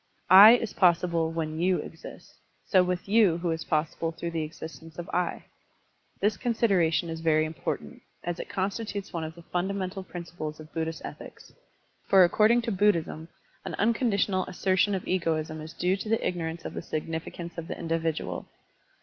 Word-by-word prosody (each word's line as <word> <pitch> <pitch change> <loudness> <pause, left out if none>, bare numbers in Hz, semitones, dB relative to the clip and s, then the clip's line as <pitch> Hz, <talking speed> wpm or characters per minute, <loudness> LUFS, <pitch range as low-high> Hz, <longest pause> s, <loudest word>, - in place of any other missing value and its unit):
"I" 200 +4 +11
is 230 -2 0
possible 170 -2 +2
when 160 -1 -3
"you" 180 +1 +2
exists, - - -10 0.3
so 185 - +4
with 180 0 -2
"you" 200 -5 +4
who 170 -1 -1
is 160 0 -3
possible 160 +1 -1
tljjrough 170 +1 -5
the 165 -1 -2
existence 160 +1 -8
of 175 - -6
"I." 180 0 -1 0.7
This 205 -1 +1
consideration 195 -9 +2
is 165 0 -5
very 155 -1 +3
important, 155 +1 -5 0.2
as 175 0 -3
it - - -6
constitutes 200 +1 -3
one 165 -2 -2
of 160 0 -6
the 170 - -13
funda 180 +4 -2
mental 190 0 -3
principles 170 -4 -7
of 155 0 -12
Buddhist 160 0 -3
ethics. - - -10 0.5
For 190 -1 +7
accord 210 +5 +4
ing 240 +1 +3
to 230 - -2
Buddhism 170 -5 +1 0.4
an - - -5
tmconditional 205 -4 +1
assertion 190 +2 +1
of 185 - -5
egoism 160 -3 -1
is 155 +1 -8
due 180 +2 0
to 215 - -6
the 225 - +1
ignorance 165 -1 -4
of - - -5
the - - -4
significance 165 +2 -5
of 165 - -7
the - - -5
individual. 165 -1 -2
175 Hz, 175 wpm, -27 LUFS, 160-195 Hz, 0.7 s, I